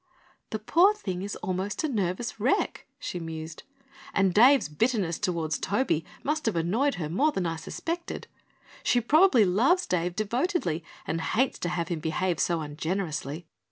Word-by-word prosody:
"The 215 Hz, -, -2 dB
poor 345 Hz, -, +4 dB
thing 185 Hz, -, -4 dB
is 200 Hz, +2 st, -4 dB
almost 195 Hz, -, -2 dB
a -, -, +2 dB
nervous 220 Hz, -, -2 dB
wreck," 265 Hz, -, 0 dB
she 180 Hz, -, -5 dB
mused, 160 Hz, -1 st, -6 dB, 0.5 s
"and 195 Hz, -2 st, +3 dB
Dave's 255 Hz, -, +6 dB
bitterness 185 Hz, 0 st, 0 dB
toward 170 Hz, -5 st, -1 dB
Toby 200 Hz, -, 0 dB, 0.2 s
must 305 Hz, -2 st, -1 dB
have 225 Hz, -, +1 dB
annoyed 215 Hz, -, +1 dB
her 160 Hz, -4 st, -3 dB
more 270 Hz, -, +2 dB
than 190 Hz, -9 st, -2 dB
I 165 Hz, -1 st, -1 dB
suspected. 335 Hz, -, -5 dB, 0.6 s
She 245 Hz, -, +3 dB
probably 280 Hz, -, +5 dB
loves 265 Hz, -, +3 dB
Dave 175 Hz, 0 st, -1 dB
devotedly 215 Hz, -, -1 dB, 0.2 s
and 165 Hz, -, -2 dB
hates 250 Hz, +9 st, 0 dB
to 175 Hz, -, -2 dB
have 170 Hz, -2 st, -2 dB
him 170 Hz, -3 st, -2 dB
behave 165 Hz, +2 st, -1 dB
so 170 Hz, -2 st, +1 dB
ungenerously. 155 Hz, 0 st, -3 dB
190 Hz, 155 wpm, -27 LUFS, 165-250 Hz, 0.6 s, Dave's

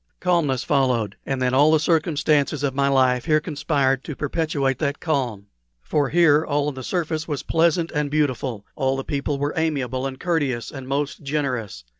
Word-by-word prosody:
Calmness 165 Hz, -8 st, +1 dB
followed, 125 Hz, -8 st, +1 dB
and 135 Hz, -1 st, -1 dB
then 125 Hz, 0 st, +1 dB
all 145 Hz, +4 st, +5 dB
the 160 Hz, -, +4 dB
circumstances 155 Hz, -3 st, +1 dB
of 140 Hz, -2 st, 0 dB
my 140 Hz, +1 st, +1 dB
life 130 Hz, -2 st, +2 dB
here 155 Hz, -2 st, +3 dB
conspired 145 Hz, -4 st, 0 dB
to 150 Hz, -, -6 dB
perpetuate 145 Hz, -3 st, -1 dB
that 145 Hz, -2 st, -1 dB
calm. 125 Hz, -, -2 dB, 0.4 s
For 145 Hz, -3 st, 0 dB
here 160 Hz, -2 st, +4 dB
all 145 Hz, -2 st, 0 dB
on -, -, -6 dB
the 130 Hz, -, -7 dB
surface 160 Hz, 0 st, -2 dB
was 145 Hz, -4 st, -3 dB
pleasant 165 Hz, +1 st, +1 dB
and 150 Hz, -1 st, -1 dB
beautiful; 130 Hz, -7 st, -1 dB
all 135 Hz, -1 st, 0 dB
the 135 Hz, -, -3 dB
people 140 Hz, 0 st, -2 dB
were 145 Hz, +1 st, -2 dB
amiable 135 Hz, -5 st, -1 dB
and 130 Hz, -1 st, -8 dB
courteous 145 Hz, -9 st, -1 dB
and 135 Hz, -2 st, -8 dB
most 140 Hz, +1 st, -2 dB
generous. 130 Hz, -, -3 dB
145 Hz, 180 wpm, -23 LUFS, 130-155 Hz, 0.4 s, all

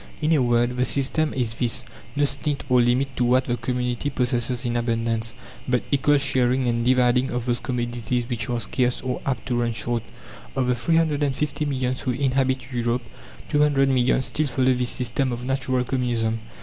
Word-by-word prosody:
In 155 Hz, +1 st, +1 dB
a 150 Hz, -, +3 dB
word, 120 Hz, 0 st, +2 dB
the 125 Hz, -, +2 dB
system 145 Hz, +4 st, +1 dB
is 120 Hz, -4 st, -1 dB
this: 120 Hz, 0 st, -1 dB, 0.3 s
no 145 Hz, 0 st, +3 dB
stint 140 Hz, +1 st, 0 dB
or 125 Hz, -1 st, +5 dB
limit 130 Hz, +2 st, +1 dB
to 125 Hz, -, +2 dB
what 130 Hz, +2 st, +3 dB
the 120 Hz, -, 0 dB
community 125 Hz, +2 st, -2 dB
possesses 125 Hz, -1 st, 0 dB
in 120 Hz, 0 st, -1 dB
abundance, 115 Hz, -1 st, -1 dB, 0.3 s
but 125 Hz, -1 st, +1 dB
equal 145 Hz, +1 st, +3 dB
sharing 130 Hz, -2 st, +2 dB
and 115 Hz, 0 st, 0 dB
dividing 125 Hz, +1 st, +3 dB
of 125 Hz, -1 st, -3 dB
those 120 Hz, -1 st, 0 dB
commodities 120 Hz, -1 st, -2 dB
which 120 Hz, -2 st, -2 dB
are 120 Hz, -1 st, 0 dB
scarce 125 Hz, +3 st, 0 dB
or 125 Hz, 0 st, -3 dB
apt 135 Hz, -, -2 dB
to 120 Hz, -2 st, 0 dB
run 120 Hz, -1 st, 0 dB
short. 120 Hz, 0 st, -1 dB, 0.5 s
Of 130 Hz, -, +1 dB
the 125 Hz, -, +2 dB
350 150 Hz, 0 st, 0 dB
millions 130 Hz, -3 st, -1 dB
who 125 Hz, -, -1 dB
inhabit 130 Hz, -1 st, 0 dB
Europe, 120 Hz, 0 st, 0 dB, 0.5 s
200 145 Hz, -2 st, +3 dB
millions 130 Hz, 0 st, +2 dB
still 155 Hz, 0 st, -1 dB
follow 130 Hz, 0 st, +2 dB
this 125 Hz, -1 st, 0 dB
system 125 Hz, +1 st, -1 dB
of 120 Hz, +1 st, -5 dB
natural 130 Hz, -1 st, 0 dB
Communism. 120 Hz, -3 st, -1 dB
125 Hz, 180 wpm, -24 LUFS, 120-135 Hz, 0.5 s, or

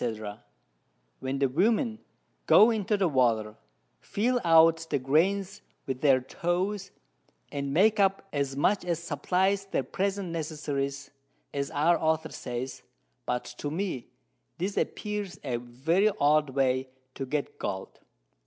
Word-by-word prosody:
_ 110 Hz, -2 st, -4 dB, 0.8 s
when 130 Hz, +1 st, -3 dB
the 135 Hz, 0 st, +3 dB
Women 220 Hz, -, +1 dB, 0.5 s
go 225 Hz, +3 st, +7 dB
into 210 Hz, -1 st, 0 dB
the 195 Hz, -2 st, +2 dB
Water, 115 Hz, -7 st, +1 dB, 0.4 s
feel 245 Hz, +4 st, 0 dB
out 165 Hz, -1 st, +5 dB
the 145 Hz, -, +1 dB
Grains 185 Hz, +9 st, +1 dB, 0.2 s
with 130 Hz, -1 st, -4 dB
their 135 Hz, -3 st, +5 dB
Toes, 180 Hz, +8 st, -2 dB, 0.6 s
and 140 Hz, -1 st, -3 dB
make 210 Hz, +8 st, +4 dB
up 195 Hz, 0 st, +2 dB
as 140 Hz, -2 st, -1 dB
much 190 Hz, +8 st, +2 dB
as 175 Hz, -2 st, -1 dB
supplys 185 Hz, +5 st, 0 dB
their 135 Hz, -, 0 dB
present 195 Hz, +6 st, -2 dB
Necessities, 145 Hz, -4 st, -3 dB, 0.4 s
as 140 Hz, -1 st, -2 dB
our 165 Hz, +4 st, +2 dB
Author 160 Hz, 0 st, 0 dB
says, 125 Hz, +1 st, -5 dB, 0.5 s
but 125 Hz, 0 st, -1 dB
to 145 Hz, -, -3 dB
me 165 Hz, -6 st, -3 dB, 0.5 s
this 190 Hz, +3 st, -2 dB
appears 205 Hz, -5 st, -3 dB
a 125 Hz, -4 st, -1 dB
very 135 Hz, -, +1 dB
odd 150 Hz, 0 st, +4 dB
Way 130 Hz, -1 st, +1 dB, 0.2 s
to 135 Hz, -, -5 dB
get 145 Hz, +2 st, -3 dB
Gold. 95 Hz, -1 st, -5 dB
155 Hz, 135 wpm, -28 LUFS, 135-195 Hz, 0.8 s, go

